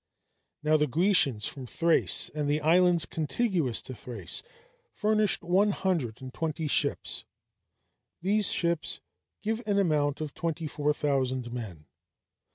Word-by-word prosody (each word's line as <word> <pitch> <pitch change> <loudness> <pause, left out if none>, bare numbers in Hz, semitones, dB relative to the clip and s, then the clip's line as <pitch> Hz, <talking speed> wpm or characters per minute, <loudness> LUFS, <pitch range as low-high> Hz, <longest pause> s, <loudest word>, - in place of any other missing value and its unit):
Now 155 +1 +4
the 150 0 +1
Grecians 145 - +3
from 130 -3 -7
Thrace, 165 +6 +2
and 150 -1 -2
the 150 +1 +2
islands 170 +1 +4
contiguous 160 - -1
to 130 - -7
Thrace, 110 -5 -3 0.5
furnished 215 -3 +2
one 190 +5 +3
hundred 160 - -1
and 130 0 -8
twenty 160 -1 -2
ships; - - 0 1.0
these 205 +3 +2
ships 170 -2 -1 0.4
give 220 +2 -1
an 205 -1 +1
amount 150 -7 +1
of 155 -2 -5
twenty 165 -1 -3
four 150 0 0
thousand 130 -4 -1
men. 95 -11 -7
155 Hz, 130 wpm, -28 LUFS, 135-180 Hz, 1.0 s, Now